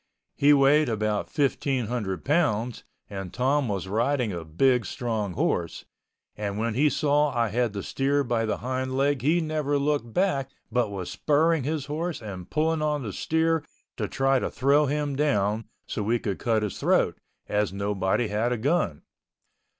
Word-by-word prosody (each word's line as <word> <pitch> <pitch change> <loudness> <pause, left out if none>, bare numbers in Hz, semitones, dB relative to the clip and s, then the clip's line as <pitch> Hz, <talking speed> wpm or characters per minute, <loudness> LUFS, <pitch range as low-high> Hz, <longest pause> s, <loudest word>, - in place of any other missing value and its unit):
He 145 +1 +5
weighed 145 0 +5
about 105 -2 0
1,500 125 - -1
pounds 125 -7 +1 0.2
and 95 -3 -6
Tom 135 +3 +1
was 100 -3 -3
riding 120 +3 0
a 85 -2 -5
big 125 +10 +2
strong 110 -6 -2
horse, 85 0 -1 0.5
and 100 -1 -3
when 115 +1 -1
he 145 +6 +3
saw 150 0 +2
I 115 -2 +2
had 120 0 0
the 100 -2 -4
steer 140 +1 0
by 120 -3 0
the - - -1
hind 130 +1 -3
leg 140 0 +2
he 160 +6 +2
never 155 -2 0
looked 140 -4 0
back 140 - +1 0.2
but 120 -2 +1
was 95 -3 -5
spurring 155 -1 +2
his 150 -2 -2
horse 155 +2 -3
and 95 -5 -8
pulling 160 +1 +1
on 150 -2 0
the 105 -4 -5
steer 160 0 +1 0.3
to - - -1
try 135 0 +2
to - - -2
throw 145 +3 +3
him 145 0 -1
down 110 -7 +1 0.2
so - - -4
we 115 +4 +1
could 100 -4 -3
cut 110 -2 +1
his 105 - -4
throat, - - +2 0.3
as 105 -1 0
nobody 100 +3 0
had 110 +4 0
a 125 - 0
gun. 120 - 0
125 Hz, 170 wpm, -26 LUFS, 105-145 Hz, 0.5 s, He